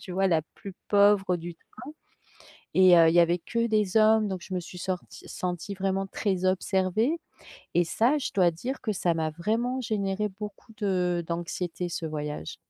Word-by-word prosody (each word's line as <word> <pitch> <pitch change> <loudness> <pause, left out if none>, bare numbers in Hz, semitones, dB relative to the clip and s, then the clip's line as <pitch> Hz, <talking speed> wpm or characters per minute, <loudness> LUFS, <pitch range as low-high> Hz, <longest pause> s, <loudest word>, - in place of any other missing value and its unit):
tu - - -10
vois? 195 +1 +2
La 165 -4 +2
plus 195 -2 -9
pauvre 200 -3 +4
du 170 0 -7
train. 290 - -13 0.8
Et 185 -2 +7
heu, 165 -1 +7
il 165 - +2
y 175 - +7
avait 170 +1 +3
que 230 +6 -1
des 215 -3 0
hommes 215 -1 +5
donc 190 -2 -4
je 190 - -6
me 180 - -1
suis 180 +1 -10
sortie 185 0 -6
sentie 180 +2 -4
vraiment 195 0 -1
très 190 -2 -2
observée. 190 - +1 0.6
Et 175 0 +4
ça, 240 - +2
je 275 - -3
dois 180 -3 +4
dire 245 +12 -5
que 220 -4 -2
ça 175 -3 0
m'a 160 -1 -1
vraiment 230 +10 -1
généré 210 -2 -1
beaucoup 210 +2 -8
de 180 -4 0
d'anxiété 175 +1 -3
ce 170 - -4
voyage. 150 - -5
190 Hz, 185 wpm, -27 LUFS, 175-210 Hz, 0.8 s, Et